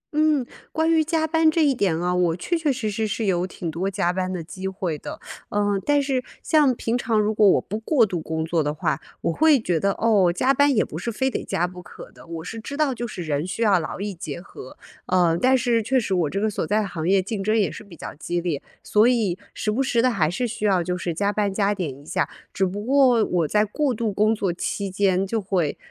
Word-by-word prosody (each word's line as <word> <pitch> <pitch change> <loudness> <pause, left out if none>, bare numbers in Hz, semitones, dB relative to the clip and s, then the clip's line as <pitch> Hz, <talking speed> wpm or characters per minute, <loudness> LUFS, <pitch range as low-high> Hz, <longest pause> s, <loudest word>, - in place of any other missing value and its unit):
嗯， 305 -4 +3 0.3
关 320 +1 +1
于 320 -1 +4
加 320 0 0
班 320 0 +3
这 315 -1 +2
一 280 - +3
点 185 -9 0
啊， 180 +1 0
我 175 -2 +2
确 345 - -2
确 315 -4 +1
实 220 -5 -2
实 220 +1 -1
是 215 +1 -2
有 180 -1 +1
挺 170 -3 -5
多 185 +4 -2
加 185 -2 0
班 185 0 -2
的 175 -3 -4
机 190 +3 -6
会 185 -4 -3
的。 - - -8 0.3
嗯， 205 -1 0
但 290 -1 +2
是 265 -2 -1 0.2
像 290 -5 +3
平 230 +1 -2
常 225 -3 +1
如 210 +1 +1
果 210 -2 +5
我 - - +4
不 215 +3 -5
过 235 0 +3
度 180 -5 -3
工 160 0 -3
作 165 -1 0
的 145 - -1
话， 155 -2 -1 0.2
我 165 - 0
会 310 -4 +5
觉 175 -7 0
得， 200 0 +1
哦， 205 -6 +3
加 255 +10 +2
班 285 +1 +4
也 210 - +3
不 160 - -7
是 235 - -3
非 265 +4 0
得 - - -3
加 175 - 0
不 180 0 -8
可 - - -12
的， - - -16
我 165 -1 -6
是 225 +5 -6
知 280 +6 -7
道 295 -4 +2
就 240 0 -4
是 180 -5 -6
人 150 0 -1
需 225 +5 -2
要 195 -4 +4
劳 160 - -5
逸 205 0 -3
结 170 -2 -6
合， 130 -7 -12 0.3
呃， 175 -3 +3
但 260 +1 +5
是 235 -2 +1
确 260 +4 +1
实 200 -4 -2
我 170 -5 +1
这 195 - -2
个 220 - +1
所 210 - -2
在 210 0 +1
行 170 -2 -3
业 195 0 +5
竞 195 +1 -3
争 215 +2 +2
也 205 - +2
是 - - -9
比 190 -5 -14
较 - - -8
激 175 +3 -3
烈， 165 -5 -2 0.2
所 215 +3 +4
以 215 -7 +1 0.2
时 215 - -1
不 250 +5 0
时 245 -3 +1
地 250 +1 +3
还 160 -8 +1
是 240 +8 -1
需 215 -1 -4
要 185 -4 +3
就 180 +1 -2
是 175 -1 -3
加 205 +3 0
班 205 -1 0
加 200 +1 +1
点 180 -7 -3
一 - - -19
下， - - -1 0.2
只 190 - +1
不 205 +3 -5
过 255 -4 +4
我 170 -4 0
在 210 +4 +2
过 280 +6 0
度 215 -2 -2
工 215 +2 +2
作 195 -4 -1
期 200 +2 -3
间 190 -1 +2
就 225 +3 -1
会， 180 -6 -1
205 Hz, 280 characters per minute, -23 LUFS, 180-240 Hz, 0.3 s, 果